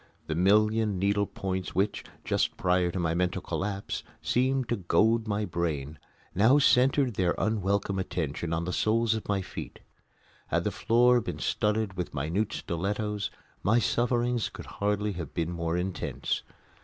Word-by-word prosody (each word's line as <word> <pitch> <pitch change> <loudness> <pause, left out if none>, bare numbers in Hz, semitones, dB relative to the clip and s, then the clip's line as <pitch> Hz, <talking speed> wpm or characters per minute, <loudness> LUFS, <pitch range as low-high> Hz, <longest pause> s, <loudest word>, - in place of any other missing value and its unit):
The 80 - -2
million 105 +4 +3
needle 100 +2 +1
points 95 -3 -4
which, 100 +3 0 0.2
just - - 0
prior 90 -1 +2
to 85 - -4
my 85 -2 0
mental 90 +1 0
collapse, 100 +2 -3 0.2
seemed 130 0 +1
to 120 - +1
goad 110 +5 +2
my 105 0 0
brain, 80 -5 -3 0.3
now 110 +9 +5
centred 135 -2 +4
their 90 -3 +1
unwelcome 100 -2 0
attention 80 -3 -3
on 85 +1 -1
the 90 - -3
soles 115 +1 +2
of 110 -2 -5
my 100 -2 +1
feet. - - -7 0.7
Had - - 0
the - - 0
floor 120 +2 +4
been - - -5
studded 105 -2 0
with 90 -4 -4
minute 85 +10 -1
stilettos 100 +4 -2 0.3
my 110 +5 +3
sufferings 120 +1 +1
could - - -10
hardly 105 +1 -1
have 85 -6 -7
been 85 +1 -1
more 85 0 -2
intense. 90 +1 -2
100 Hz, 155 wpm, -28 LUFS, 90-110 Hz, 0.7 s, now